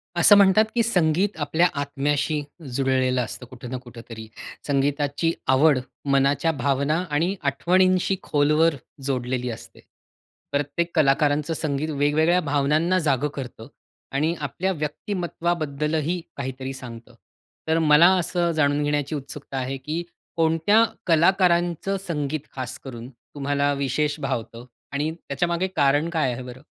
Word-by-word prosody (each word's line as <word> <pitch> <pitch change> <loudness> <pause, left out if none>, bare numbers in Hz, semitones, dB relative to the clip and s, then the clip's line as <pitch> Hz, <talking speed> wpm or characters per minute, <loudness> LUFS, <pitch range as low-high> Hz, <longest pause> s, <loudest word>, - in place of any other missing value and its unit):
असं 175 +4 +7
म्हणतात 200 +2 +6
की 235 - +3
संगीत 185 -2 +1
आपल्या 160 +4 +2
आत्म्याशी 145 +2 -1 0.3
जुळलेलं 130 -1 +1
असतं 120 +2 -5
कुठं 125 0 -10
ना 130 - -2
कुठेतरी. 115 -2 -10 0.4
संगीताची 145 +2 0 0.2
आवड, 135 +2 +4 0.3
मनाच्या 140 +4 +2
भावना 140 +1 0
आणि 165 +6 0
आठवणींशी 185 +6 +2
खोलवर 150 +2 +2 0.3
जोडलेली 125 -2 -2
असते. 115 - -9 0.7
प्रत्येक 145 +4 -1
कलाकारांचं 150 +1 +2
संगीत 150 -1 -2
वेगवेगळ्या 155 +4 +2
भावनांना 155 +4 +1
जागं 145 -4 +1
करतं 125 -4 -7 0.4
आणि 155 +5 0
आपल्या 150 +6 -2
व्यक्तिमत्त्वाबद्दलही 160 -1 -2 0.2
काहीतरी 130 -1 -5
सांगतं. 120 -3 -10 0.5
तर 160 +1 +2
मला 155 +1 +6
असं 175 0 0
जाणून 145 -1 +2
घेण्याची 145 0 -1
उत्सुकता 140 -1 -7
आहे 130 +1 -3
की 155 +6 -4 0.3
कोणत्या 165 +7 +4 0.2
कलाकारांचं 175 +2 +2
संगीत 150 -2 -2 0.2
खासकरून, 125 -1 -7
तुम्हाला 140 +3 -2
विशेष 140 +2 -1
भावतं 120 -3 -4 0.3
आणि 150 +3 -1
त्याच्यामागे 170 +3 -2
कारण 145 +2 +3
काय 160 -6 0
आहे 120 - -6
बरं? 125 +1 -10
145 Hz, 120 wpm, -24 LUFS, 135-165 Hz, 0.7 s, असं